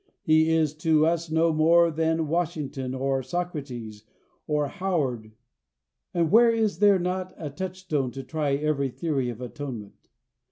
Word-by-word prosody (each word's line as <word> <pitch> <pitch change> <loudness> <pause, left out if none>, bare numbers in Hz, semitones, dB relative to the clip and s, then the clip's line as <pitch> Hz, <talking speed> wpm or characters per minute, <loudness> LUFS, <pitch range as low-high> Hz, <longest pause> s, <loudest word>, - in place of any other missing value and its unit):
He 160 0 +4
is 160 -2 +2
to 155 -1 +3
us 165 0 0
no 160 +1 +2
more 165 +2 +4
than 160 0 0
Washington 150 -6 -2
or 135 0 0
Socrates, 130 -8 -5 0.4
or 150 -1 +1
Howard. 140 - -2 0.8
And 170 -2 0
where 235 +1 +7
is 225 -2 0
there 205 -2 +6
not 185 +1 -3
a 150 -3 -6
touchstone 180 -4 -3
to 135 - -6
try 150 -2 -1
every 140 -2 0
theory 135 -3 -2
of 120 0 -7
atonement? 125 -5 -8
155 Hz, 145 wpm, -26 LUFS, 135-170 Hz, 0.8 s, where